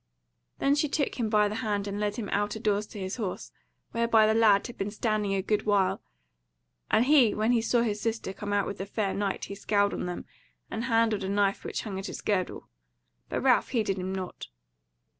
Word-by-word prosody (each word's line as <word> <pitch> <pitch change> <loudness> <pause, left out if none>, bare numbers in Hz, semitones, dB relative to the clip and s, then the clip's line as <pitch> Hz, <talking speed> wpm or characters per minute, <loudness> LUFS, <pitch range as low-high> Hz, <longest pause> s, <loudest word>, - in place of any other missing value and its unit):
Then 275 - +2
she 295 +1 +1
took 285 -2 -1
him 225 -2 0
by 210 -1 +4
the 210 +1 -4
hand 205 -2 -1
and 200 0 -4
led 210 -1 -1
him 215 -3 -4
out 205 +1 0
a - - -5
doors 210 -1 0
to 210 - -9
his 190 +3 -4
horse, 205 -6 -4 0.4
whereby 230 -1 +4
the 215 - +3
lad 215 -3 +4
had 240 - -7
been 195 - -3
standing 210 -2 -1
a 190 - -1
good 210 +1 0
while; 200 -3 +2 0.9
and 220 +3 +4
he 270 -6 +5
when 215 +2 +2
he 235 -2 +3
saw 235 +1 +2
his 210 -3 -2
sister 225 -3 -2
come 205 +1 -5
out 205 -1 +2
with 200 - -5
the 195 - -4
fair 200 -1 -1
knight 200 -1 -2
he - - -7
scowled 200 0 +1
on - - -3
them, 175 - -5 0.5
and 230 - -3
handled 225 -3 +2
a 190 - -2
knife 200 0 +1
which - - -4
hung 195 -3 -4
at 195 - -5
his - - -6
girdle; 190 -3 -1 0.6
but - - -2
Ralph 255 -2 +3
heeded 210 -6 0
him 185 +1 -3
nought. 190 -1 -5
210 Hz, 220 wpm, -28 LUFS, 200-225 Hz, 0.9 s, he